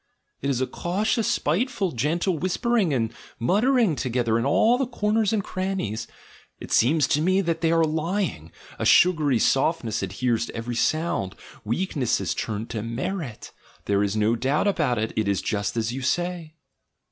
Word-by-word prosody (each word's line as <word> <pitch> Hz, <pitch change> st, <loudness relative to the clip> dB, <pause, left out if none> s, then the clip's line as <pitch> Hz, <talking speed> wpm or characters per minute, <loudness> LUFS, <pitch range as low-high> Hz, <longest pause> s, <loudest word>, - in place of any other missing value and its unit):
It 140 Hz, -, -1 dB
is 130 Hz, -2 st, 0 dB
a -, -, +2 dB
cautious, 210 Hz, -, -1 dB
spiteful, 200 Hz, -, 0 dB
gentle 160 Hz, -, 0 dB
whispering 195 Hz, +1 st, +1 dB
and 115 Hz, -4 st, 0 dB, 0.2 s
muttering 215 Hz, -, +2 dB
together 120 Hz, -4 st, 0 dB
in 120 Hz, -, 0 dB
all 230 Hz, -, +3 dB
the 270 Hz, -, 0 dB
corners 215 Hz, -3 st, +1 dB
and 215 Hz, -3 st, 0 dB
crannies. 185 Hz, -, -3 dB, 0.5 s
It -, -, -9 dB
seems 145 Hz, +5 st, +4 dB
to 150 Hz, 0 st, +2 dB
me 185 Hz, +4 st, +3 dB
that 170 Hz, -3 st, -2 dB
they 165 Hz, -1 st, +2 dB
are 165 Hz, 0 st, +4 dB
lying; 160 Hz, -, -2 dB, 0.3 s
a -, -, -2 dB
sugary 155 Hz, -8 st, +4 dB
softness 125 Hz, -2 st, +1 dB
adheres 120 Hz, -2 st, -1 dB
to -, -, -9 dB
every 120 Hz, +1 st, -4 dB
sound. 120 Hz, -, 0 dB, 0.3 s
Weak 145 Hz, -, -2 dB
ness 125 Hz, -5 st, +1 dB
is -, -, -1 dB
turned 110 Hz, 0 st, -4 dB
to 110 Hz, -, -3 dB
merit, 120 Hz, -, -5 dB, 0.3 s
there 100 Hz, 0 st, +1 dB
is 100 Hz, 0 st, 0 dB
no 110 Hz, +2 st, +2 dB
doubt 135 Hz, -, 0 dB
about 150 Hz, -11 st, +1 dB
it 110 Hz, +1 st, -2 dB
— -, -, -26 dB
it 110 Hz, -2 st, 0 dB
is 100 Hz, -1 st, +1 dB
just 105 Hz, +1 st, -2 dB
as 115 Hz, 0 st, 0 dB
ycu 130 Hz, +1 st, -5 dB
say." 175 Hz, +1 st, -2 dB
150 Hz, 175 wpm, -24 LUFS, 115-185 Hz, 0.5 s, seems